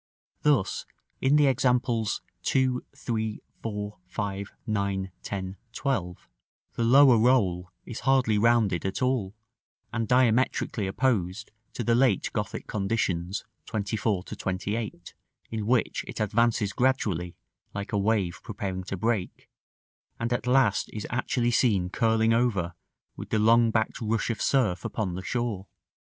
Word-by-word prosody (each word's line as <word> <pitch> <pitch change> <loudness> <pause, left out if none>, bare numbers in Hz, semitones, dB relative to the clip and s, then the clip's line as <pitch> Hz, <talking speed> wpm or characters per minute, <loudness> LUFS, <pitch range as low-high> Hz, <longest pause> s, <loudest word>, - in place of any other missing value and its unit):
Thus, 145 -10 +1 0.3
in 135 +2 +4
the 150 -1 +5
examples 125 -4 +1 0.2
2, 130 -1 +1
3, 110 -2 -2 0.2
4, 105 -1 -5
5, 100 -1 -4
9, 100 -3 -1
10, 95 -1 -5 0.2
12, 95 -11 -2 0.4
the 115 - -1
lower 130 0 +7
roll 95 -8 +2 0.2
is 120 - -6
hardly 125 -5 +3
rounded 110 -5 +3
at 95 +6 -2
all, 120 -6 0 0.6
and 115 -2 -1
diametrically 125 -4 +2
opposed 105 -2 0 0.2
to 120 - -3
the 115 - +2
late 120 -5 +2
Gothic - - -3
conditions, 95 -3 -1 0.2
24 105 -3 -1
to - - -8
28, 95 -1 -4 0.4
in 110 -2 -3
which 125 -1 +1
it - - -7
advances 110 -1 +1
gradually, 100 -10 0 0.4
like 100 +3 -4
a - - +2
wave 100 -4 +1
preparing 95 -4 -4
to 95 - -4
break, 110 -2 -2 0.7
and 115 +1 -1
at 120 0 -2
last 125 -5 +3
is 105 - -5
actually 120 0 0
seen 100 -7 +2
curling 115 +1 +2
over 105 -8 +1 0.4
with - - -8
the - - +1
long 115 +2 +5
backed 110 +1 -1
rush 115 +1 0
of 115 - -5
surf 110 -10 +2
upon 110 -4 -2
the 90 - -4
shore. 110 -2 -2
110 Hz, 135 wpm, -27 LUFS, 100-120 Hz, 0.7 s, lower